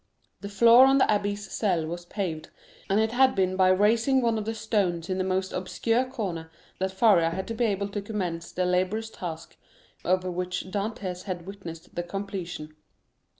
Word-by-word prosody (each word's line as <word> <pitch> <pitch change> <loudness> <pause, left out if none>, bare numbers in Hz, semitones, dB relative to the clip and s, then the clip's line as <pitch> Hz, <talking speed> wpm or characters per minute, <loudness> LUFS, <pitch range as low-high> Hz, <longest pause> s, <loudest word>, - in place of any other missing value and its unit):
The 200 - -7
floor 235 +5 +7
of 270 - +4
the 265 - +5
abbé's 205 0 -1
cell 180 -7 0
was 175 +2 -6
paved, 175 -7 -4 0.4
and 195 +2 +3
it 220 0 +1
had 260 +2 +4
been 185 -1 +1
by 185 -1 +4
raising 225 +7 +3
one 230 -3 +1
of 210 - -5
the 225 +1 -3
stones 190 -6 -1
in 185 - -1
the - - +1
most 190 0 -1
obscure 225 +7 0
corner 195 -11 -5 0.3
that 190 0 -1
Faria 190 -4 +4
had 190 +3 -4
been 235 0 +1
able 200 0 -1
to 205 0 -4
commence 180 -5 -4
the 185 - -1
laborious 185 +5 0
task 165 -2 -7 0.5
of 185 +1 +2
which 180 0 -3
Dantès 195 -3 -4
had 180 -3 -5
witnessed 180 -4 -9
the 175 - -2
completion. 180 -4 -6
190 Hz, 180 wpm, -27 LUFS, 180-215 Hz, 0.5 s, floor